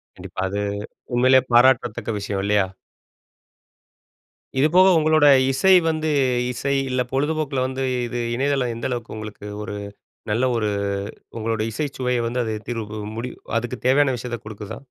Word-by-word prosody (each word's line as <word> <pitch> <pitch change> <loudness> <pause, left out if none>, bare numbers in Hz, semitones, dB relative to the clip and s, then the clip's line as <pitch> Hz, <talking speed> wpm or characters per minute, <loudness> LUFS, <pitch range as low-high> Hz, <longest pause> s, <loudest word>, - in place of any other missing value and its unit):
கண்டிப்பா - - -7
அது, 100 +2 -2 0.5
உண்மையிலேயே 130 +2 +5
பாராட்டத்தக்க 120 -2 +3
விஷயம் 100 -1 -3
இல்லயா? 100 -1 +2 1.9
இது 140 +3 +5
போக 185 +1 +7
உங்களோட 155 -1 +4 0.2
இசை 135 +9 +3 0.2
வந்து 155 -1 0 0.4
இசை 135 +3 -2 0.2
இல்ல 130 0 0
பொழுதுபோக்கில 145 -1 0
வந்து 130 +1 -3 0.2
இது 120 +1 -4 0.2
இணையதளம் 135 -1 0
எந்த 115 - -3
அளவுக்கு 120 -2 -4
உங்களுக்கு 105 -1 -8 0.2
ஒரு 105 - -5 0.6
நல்ல 115 +4 +1
ஒரு 110 -2 0 0.7
உங்களோட 110 0 -1
இசைச் 140 +5 -4
சுவையை 125 -1 0
வந்து 120 +2 -1
அது 110 - -2 0.2
தீர்வு 110 -3 -4 0.2
முடிவு 125 +2 -5 0.2
அதுக்குத் 120 +1 -4
தேவையான 135 +1 +4
விஷயத்த 120 0 -5
குடுக்குதா? 105 -1 -7
125 Hz, 135 wpm, -22 LUFS, 110-135 Hz, 1.9 s, போக